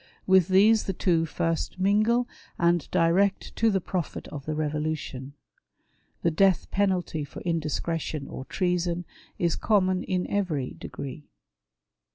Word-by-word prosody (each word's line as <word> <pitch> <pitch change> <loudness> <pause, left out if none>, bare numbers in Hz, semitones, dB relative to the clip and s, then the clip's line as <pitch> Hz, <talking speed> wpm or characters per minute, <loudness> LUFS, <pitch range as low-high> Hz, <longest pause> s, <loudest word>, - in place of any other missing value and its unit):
With 190 -3 +5
these 210 +4 +5
tbe 195 - -3
two 165 -3 +2
first 165 +4 -2
mingle, 215 +5 +3 0.3
and 170 -2 +2
direct 190 +4 +2
to 225 - +4
the 195 -2 +2
profit 180 -2 -4
of 140 -1 -8
the 155 - -1
Eevolution. 150 -3 -3 0.9
The 170 - +3
death 190 +2 +2
penalty 185 -6 0
for 145 - -9
indiscretion 160 -2 -2
or 130 - -7
treason 175 -1 -1 0.3
is 170 -2 +1
common 185 -4 +2
in 185 -1 -1
every 160 -10 -1
degree. 140 +2 -8
175 Hz, 130 wpm, -27 LUFS, 155-190 Hz, 0.9 s, With